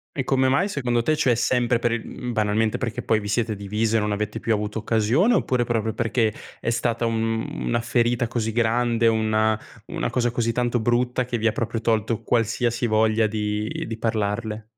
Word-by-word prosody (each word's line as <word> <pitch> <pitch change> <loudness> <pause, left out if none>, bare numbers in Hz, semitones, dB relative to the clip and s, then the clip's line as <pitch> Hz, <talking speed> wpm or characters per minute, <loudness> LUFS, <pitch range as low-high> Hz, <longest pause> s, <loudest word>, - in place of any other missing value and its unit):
E 135 - -1
come 130 0 +2
mai 160 +10 +2
secondo 120 - -1
te? 155 +6 +2
Cioè 130 -6 +2
sempre 120 0 +1
per 115 0 0
il 115 -1 -2
mhmm, 125 -1 -6
banalmente 110 0 +1
perché 115 -4 -3
poi 110 - +2
vi 105 - -6
siete 110 +1 0
divise 105 +3 0
e - - +3
non 105 0 -1
avete 105 +1 -2
più 115 - 0
avuto 105 +1 -2
occasione, 115 - +2
oppure 125 -2 +1
proprio 110 -2 -1
perché 115 -2 0 0.3
è - - -2
stata 115 0 0
un 115 0 -1 0.2
una 120 - +1
ferita 120 0 +1
così 115 -1 -2
grande, 115 0 +1
una 110 -1 +2 0.3
una - - -2
cosa 120 -1 0
così 120 -1 0
tanto 120 0 0
brutta 125 +2 +1
che 120 -1 -2
vi 110 - -3
ha 115 - +4
proprio 115 +1 -2
tolto 110 -1 0
qualsiasi 120 +1 0
voglia 110 0 +3
di 105 0 -3
di 115 - -5
parlarle? 110 0 -2
115 Hz, 195 wpm, -23 LUFS, 110-120 Hz, 0.3 s, ha